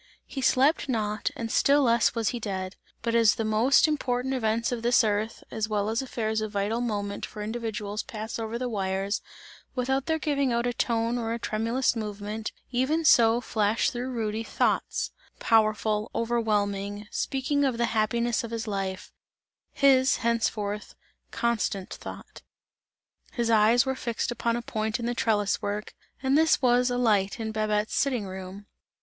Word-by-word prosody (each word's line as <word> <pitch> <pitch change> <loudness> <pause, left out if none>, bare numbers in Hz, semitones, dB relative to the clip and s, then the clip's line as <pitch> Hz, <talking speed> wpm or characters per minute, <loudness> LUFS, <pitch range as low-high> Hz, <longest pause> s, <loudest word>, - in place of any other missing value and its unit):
He 270 - -6
slept 275 +3 +3
not 215 -3 -1
and 225 -1 -4
still 285 +1 +4
less 235 -1 +3
was 230 -2 +1
he 240 - -3
dead; 190 -3 -4 0.3
but 230 -1 0
as 230 -2 +5
the 225 - -2
most 225 +8 +4
important 265 -3 -1
events 230 -2 0
of 240 -2 -2
this 240 +1 +4
earth, 215 +1 -1
as 220 -1 -2
well 210 -1 0
as 225 +3 0
affairs 220 -4 -2
of 215 0 -4
vital 205 +4 0
moment 205 -4 -3
for 210 - -5
individuals 215 -2 -3
pass 220 -2 -6
over 225 +1 -3
the 250 +1 -2
wires, 195 -2 -1 0.5
without 265 +1 0
their 320 -1 +1
giving 280 -4 0
out 235 0 0
a 245 - 0
tone 230 0 0
or 225 -1 -2
a - - -2
tremulous 230 +4 0
movement, 210 0 -4 0.2
even 280 +6 +1
so 230 -4 +6
flashed 215 -2 +1
through 250 +1 -4
Rudy, 225 -3 -2
thoughts - - 0 0.3
powerful, 215 -1 +2
overwhelming, 210 -3 -1
speaking 280 +2 0
of 260 -4 +1
the 235 - +2
happiness 235 +2 +1
of 230 - -5
his 230 0 -4
life; 195 -3 -4 0.6
his, 270 -1 +4
henceforth, 210 -3 -1 0.3
"constant 220 -4 -1
thought." - - -10 0.9
His 235 -2 0
eyes 225 +3 +5
were 265 - 0
fixed 240 -1 -3
upon 235 0 -1
a 240 - -3
point 220 0 -2
in 235 - -3
the 240 - 0
trellis 210 -4 +1
work, 205 +1 -4 0.3
and 265 +1 +2
this 320 +1 +4
was 250 -1 +3
a 245 - -1
light 205 -5 +2
in 220 -1 -3
Babette's 215 0 0
sitting 255 -7 +1
room. 190 +1 -8
225 Hz, 165 wpm, -27 LUFS, 210-245 Hz, 0.9 s, so